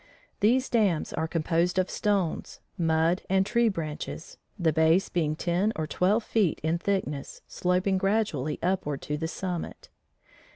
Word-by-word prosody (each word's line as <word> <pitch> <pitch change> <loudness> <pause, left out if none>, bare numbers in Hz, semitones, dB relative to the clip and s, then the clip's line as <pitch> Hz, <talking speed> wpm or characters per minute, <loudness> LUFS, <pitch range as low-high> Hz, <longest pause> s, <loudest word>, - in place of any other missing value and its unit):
These 250 +5 +3
dams 205 -9 +1
are 160 - -1
composed 165 +2 0
of 185 0 +2
stones, 200 -6 -1 0.2
mud 165 +1 +2
and 190 0 +3
tree 235 +2 +3
branches, 160 -3 -6 0.2
the 165 -4 +2
base 160 +4 +3
being 155 -3 0
ten 180 +6 0
or 160 - -2
twelve 195 +8 +1
feet 210 -8 +1
in 160 +2 +1
thickness 175 -8 -3
sloping 185 +1 +1
gradually 195 -8 0
upward 170 -6 -1
to 150 - -2
the 160 +2 -2
summit. 175 +1 -5
175 Hz, 140 wpm, -27 LUFS, 160-195 Hz, 0.2 s, These